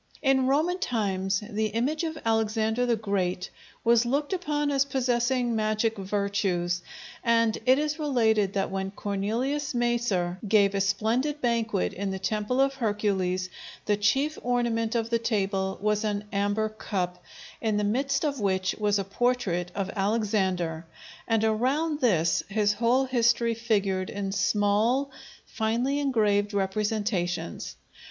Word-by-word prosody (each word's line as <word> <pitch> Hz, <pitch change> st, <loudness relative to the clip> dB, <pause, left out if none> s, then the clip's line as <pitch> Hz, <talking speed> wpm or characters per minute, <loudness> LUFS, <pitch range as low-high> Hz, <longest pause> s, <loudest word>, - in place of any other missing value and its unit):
In 265 Hz, -2 st, +3 dB
Roman 320 Hz, +7 st, +1 dB
times 195 Hz, -, -1 dB
the 215 Hz, -1 st, -1 dB
image 255 Hz, +10 st, -1 dB
of 320 Hz, -1 st, -3 dB
Alexander 220 Hz, +1 st, +1 dB
the 235 Hz, -, +3 dB
Great 195 Hz, -4 st, -2 dB, 0.3 s
was 235 Hz, 0 st, +4 dB
looked 285 Hz, +7 st, -1 dB
upon 295 Hz, -5 st, -1 dB
as 275 Hz, -1 st, +3 dB
possessing 245 Hz, -2 st, 0 dB
magic 215 Hz, +1 st, 0 dB
virtues, 195 Hz, -3 st, -1 dB, 0.4 s
and 230 Hz, -1 st, +3 dB
it 260 Hz, +1 st, +6 dB
is 300 Hz, +1 st, -1 dB
related 220 Hz, -9 st, +2 dB
that 195 Hz, -1 st, -1 dB
when 190 Hz, 0 st, -2 dB
Cornelius 225 Hz, +9 st, -2 dB
Macer 235 Hz, -7 st, 0 dB
gave 200 Hz, -1 st, +4 dB
a 195 Hz, -, 0 dB
splendid 225 Hz, +9 st, 0 dB
banquet 230 Hz, -, 0 dB
in 200 Hz, +1 st, -3 dB
the 190 Hz, -, -3 dB
temple 210 Hz, +6 st, -1 dB
of 275 Hz, 0 st, +3 dB
Hercules, 195 Hz, -6 st, -1 dB, 0.3 s
the 210 Hz, -, +2 dB
chief 270 Hz, +10 st, +1 dB
ornament 235 Hz, -2 st, 0 dB
of 230 Hz, 0 st, -1 dB
the 230 Hz, -, +2 dB
table 195 Hz, -4 st, -1 dB
was 210 Hz, +1 st, 0 dB
an 205 Hz, -1 st, -1 dB
amber 205 Hz, +2 st, 0 dB
cup, 180 Hz, -4 st, -4 dB, 0.4 s
in 220 Hz, -2 st, 0 dB
the 210 Hz, -, 0 dB
midst 275 Hz, +8 st, 0 dB
of 280 Hz, -3 st, -1 dB
which 190 Hz, -2 st, 0 dB
was 210 Hz, -1 st, +2 dB
a 195 Hz, -, -1 dB
portrait 195 Hz, -4 st, 0 dB
of 195 Hz, -1 st, -2 dB
Alexander, 195 Hz, -6 st, 0 dB, 0.4 s
and 225 Hz, -1 st, +2 dB
around 270 Hz, +8 st, +1 dB
this 175 Hz, -, +2 dB
his 210 Hz, 0 st, +2 dB
whole 240 Hz, +5 st, +2 dB
history 235 Hz, -2 st, +2 dB
figured 200 Hz, -5 st, 0 dB
in 200 Hz, -1 st, -3 dB
small, 210 Hz, +7 st, +1 dB, 0.3 s
finely 240 Hz, +6 st, -1 dB
engraved 210 Hz, -7 st, +1 dB
representations. 195 Hz, -, -1 dB
220 Hz, 140 wpm, -27 LUFS, 200-245 Hz, 0.4 s, it